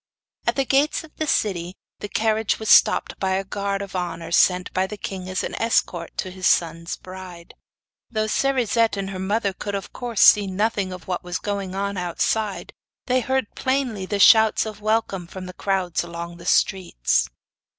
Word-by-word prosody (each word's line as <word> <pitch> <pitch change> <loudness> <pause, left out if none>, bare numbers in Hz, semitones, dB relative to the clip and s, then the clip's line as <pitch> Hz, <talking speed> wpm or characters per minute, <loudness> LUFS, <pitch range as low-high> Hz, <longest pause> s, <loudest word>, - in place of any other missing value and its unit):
At - - +2
the 275 - +1
gates 280 +5 +2
of 315 - -16
the 310 - -2
city 180 -7 0 0.2
the 205 - -6
carriage 220 0 +1
was 220 - -4
stopped - - +5
by 190 -1 0
a 190 +1 0
guard 200 0 -3
of 195 -1 -9
honour 175 -2 -4
sent 180 +1 +3
by 185 +1 +1
the 210 - -7
king 190 -2 -6
as 185 - -2
an - - -4
escort 180 -7 0
to 185 - -3
his 185 -1 -1
son's 165 0 +1
bride. 185 -2 -11 0.6
Though 215 -2 -1
Cerisette 230 -2 +1
and 195 0 -3
her 190 - -6
mother 200 +1 0
could 200 +2 -5
of 195 - -6
course 240 -4 -2
see 205 -2 +7
nothing 200 0 -1
of 180 -2 -9
what 180 -1 -3
was 180 0 -3
going 200 -2 -4
on 200 0 -2
outside, 195 +4 -1 0.3
they 255 0 +2
heard 265 -3 -1
plainly 260 -8 -1
the 205 - -1
shouts 220 +2 +6
of 215 -1 -7
welcome 210 -4 0
from 185 +1 -8
the 185 - -8
crowds 190 -3 -1
along 170 0 -7
the 170 0 -11
streets. 185 - +1
195 Hz, 185 wpm, -23 LUFS, 185-220 Hz, 0.6 s, see